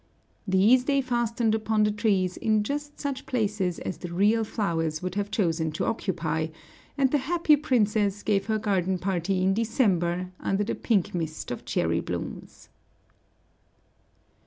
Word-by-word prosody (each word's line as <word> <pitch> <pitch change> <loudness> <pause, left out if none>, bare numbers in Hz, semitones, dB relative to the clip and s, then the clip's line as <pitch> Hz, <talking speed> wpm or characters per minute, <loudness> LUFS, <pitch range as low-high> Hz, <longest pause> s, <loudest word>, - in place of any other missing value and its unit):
These 210 +7 +4
they 275 0 +2
fastened 240 -3 0
upon 220 -1 +1
the 210 - +3
trees 200 -4 +1
in 215 -1 +1
just 290 +5 -4
such 275 -2 -4
places 210 -8 -1
as 185 - -5
the 175 - -6
real 210 +6 +3
flowers 165 -7 -2
would 185 -1 -3
have 205 +1 -2
chosen 165 -6 0
to - - -2
occupy, 165 -7 -1 0.5
and 270 -2 +3
the 295 - +3
happy 315 +2 +3
princess 210 -8 +1
gave 200 -1 +1
her 220 -1 +1
garden 190 -3 0
party 185 0 -1
in 190 +1 +3
December 185 -6 +1
under 195 +1 0
the 210 - -2
pink 205 -7 0
mist 160 -6 -4
of 120 - -6
cherry - - 0
blooms. - - -6
205 Hz, 150 wpm, -26 LUFS, 180-230 Hz, 0.5 s, These